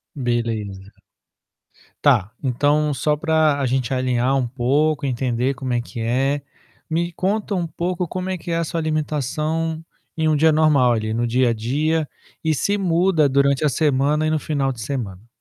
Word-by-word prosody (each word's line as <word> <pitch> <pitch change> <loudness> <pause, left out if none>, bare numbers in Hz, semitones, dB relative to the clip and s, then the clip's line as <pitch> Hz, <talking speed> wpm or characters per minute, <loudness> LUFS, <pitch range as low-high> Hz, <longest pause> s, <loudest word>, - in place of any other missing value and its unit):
Beleza. 115 -6 -3 1.1
Tá, 110 -8 +3
então, 145 +3 +1
só 150 +3 0
pra 155 -2 +2
a 140 - 0
gente 130 0 0
alinhar 130 0 +1
um 130 -2 +1
pouco, 140 +5 +1
entender 125 +1 -1
como 125 0 -3
é 120 - +1
que 120 0 -9
é, 135 +5 0 0.5
me 170 +2 -1
conta 200 +4 -1
um 175 - -1
pouco 175 +2 -3
como 185 +2 -4
é 185 - -2
que 175 - -7
é 165 - +1
a 170 - 0
sua 165 +1 -3
alimentação 155 +1 -2 0.3
em 160 -1 0
um 155 - +3
dia 160 +2 +4
normal 150 -5 +4
ali, 110 -1 -2
no 120 +1 0
dia 120 +1 +2
a - - +2
dia, 150 +8 0 0.4
e 160 -1 +2
se 200 +8 0
muda 175 -4 +2
durante 140 +1 +2
a - - +4
semana 145 +1 +1
e - - +1
no 155 0 +1
final 140 -3 -1
de 125 - -9
semana? 110 -4 -5
140 Hz, 180 wpm, -21 LUFS, 125-160 Hz, 1.1 s, dia